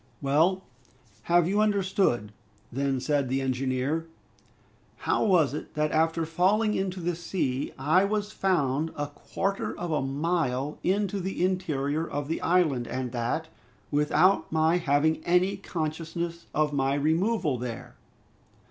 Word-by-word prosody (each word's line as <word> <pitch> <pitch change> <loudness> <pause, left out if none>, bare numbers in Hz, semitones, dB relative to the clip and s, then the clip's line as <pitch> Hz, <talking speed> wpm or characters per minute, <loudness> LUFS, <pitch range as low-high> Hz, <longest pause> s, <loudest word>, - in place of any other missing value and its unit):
"Well, 160 +7 +2 0.7
have 175 -1 +5
you 205 +3 +2
understood," 195 - +1 0.4
then 135 +1 0
said 140 0 0
the 135 +1 +1
engineer, 135 +4 -1 1.0
"how - - +2
was 170 - +3
it 150 - -7
that 150 0 +1
after 160 +1 +1
falling 195 +7 +2
into 190 -2 -2
the 175 0 -1
sea, 160 -6 -2
I 155 +8 +3
was 210 0 -1
found 160 -7 +1
a 145 - -2
quarter 195 +6 -3
of 175 -1 -3
a 155 - +1
mile 145 -1 -1
into 200 +1 0
the 190 -1 -1
interior 155 -5 -1
of 145 -3 -4
the 165 - -2
island, 160 -9 +2
and 130 -1 -3
that, 120 +7 -2 0.4
without 155 +4 +3
my 160 +2 +3
having 160 0 +1
any 180 +3 +2
consciousness 165 +1 -4
of 150 -1 +1
my 135 0 +1
removal 160 - +1
there?" 120 -2 -6
160 Hz, 135 wpm, -27 LUFS, 140-180 Hz, 1.0 s, have